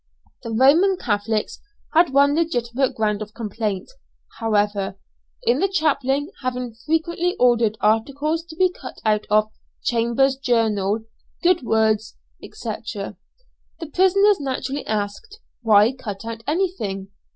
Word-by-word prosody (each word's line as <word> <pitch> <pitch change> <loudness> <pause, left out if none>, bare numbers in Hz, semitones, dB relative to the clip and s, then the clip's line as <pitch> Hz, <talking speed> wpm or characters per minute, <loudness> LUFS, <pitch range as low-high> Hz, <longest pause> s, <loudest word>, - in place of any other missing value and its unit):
The - - -7
Roman 295 - +4
Catholics 210 - -1 0.3
had 340 +2 +5
one 280 +1 +4
legitimate 260 -5 0
ground 210 -1 0
of 215 0 -8
complaint, 215 - -3 0.5
however, 205 -3 0 0.5
in 475 0 +2
the 390 - +3
chaplain 290 -4 0
having 250 -2 -3
frequently 330 +8 -1
ordered 235 -3 +3
articles 280 +9 +1
to 325 - -11
be 370 +1 +3
cut - - -10
out 215 -1 +1
of 215 +1 +3 0.3
"Chambers's 245 +3 +1
Journal," 220 -5 +1 0.4
"Good 355 -1 +4
Words," 220 -2 +1 0.3
&c. - - -10 0.3
The 425 -9 -11
prisoners 395 +2 +4
naturally 270 0 -3
asked 210 - -4 0.2
"Why 215 -1 +5
cut 220 -6 -7
out 230 0 -6
anything? 290 - -2
245 Hz, 120 wpm, -22 LUFS, 215-315 Hz, 0.5 s, had